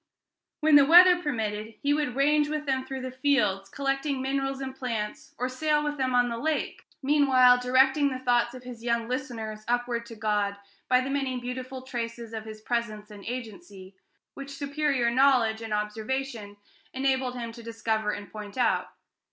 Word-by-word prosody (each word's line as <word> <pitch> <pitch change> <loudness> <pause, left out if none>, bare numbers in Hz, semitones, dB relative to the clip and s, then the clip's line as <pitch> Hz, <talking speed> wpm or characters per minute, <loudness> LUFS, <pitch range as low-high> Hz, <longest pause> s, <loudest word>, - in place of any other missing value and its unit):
When 305 -1 +7
the 280 - +6
weather 355 +2 +8
permitted, 220 -6 -3
he 285 +1 +1
would 290 -4 -1
range 295 +2 +3
with 305 0 -3
them 265 -2 0
through 265 -1 -5
the 255 0 -5
fields, 235 -8 +1
collecting 275 +2 -1
minerals 270 0 -2
and 265 -1 -5
plants, 225 -5 -5
or 250 - -1
sail 300 +3 0
with 295 0 -2
them 260 -2 0
on 245 0 +4
the 235 -1 -4
lake, 310 +3 -2 0.2
meanwhile 260 -3 +5
directing 265 +3 +3
the 260 - -4
thoughts 245 -1 +1
of 255 - -10
his 245 -2 -9
young 235 -1 0
listeners 230 -4 -4
upward 240 -1 -1
to 230 - -9
God, 210 -2 0 0.3
by 250 0 +5
the 265 +1 -3
many 270 -2 -1
beautiful 255 +1 -6
traces 235 -2 -5
of 220 -1 -5
his 215 -1 -9
presence 215 -2 -3
and 205 -1 -11
agency, 225 - -8 0.4
which 275 0 -8
superior 280 -4 0
knowledge 240 -4 +3
and 225 -1 -7
observation 215 +1 -3 0.4
enabled 265 -1 0
him 235 -1 -5
to 235 +1 -11
discover 225 -2 -2
and 205 -1 -5
point 210 +1 -8
out. 250 - +1
250 Hz, 175 wpm, -27 LUFS, 225-275 Hz, 0.4 s, weather